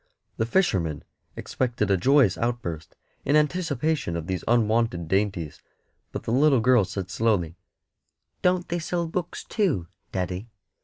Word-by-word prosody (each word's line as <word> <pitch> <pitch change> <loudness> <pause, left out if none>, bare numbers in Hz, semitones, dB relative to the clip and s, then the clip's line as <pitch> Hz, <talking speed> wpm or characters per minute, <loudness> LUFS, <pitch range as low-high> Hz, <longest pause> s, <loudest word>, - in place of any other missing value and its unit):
The 110 - 0
fisherman 95 - +1 0.3
expected 120 -5 -1
a - - +5
joyous 130 0 +4
outburst 115 -10 -3 0.3
in 145 - +2
anticipation 150 - 0
of 85 -1 -3
these 95 -1 -3
unwonted 115 -6 +2
dainties, 95 -4 -1 0.5
but - - -5
the - - -3
little 135 +1 +4
girl 120 -3 +4
said 95 0 -5
slowly 100 -8 +1 0.9
"Don't 180 -1 +2
they 175 - -1
sell 170 +1 -2
books, 165 +1 -4
too, 150 - -1 0.2
daddy? 95 +4 -3
115 Hz, 135 wpm, -25 LUFS, 90-150 Hz, 0.9 s, a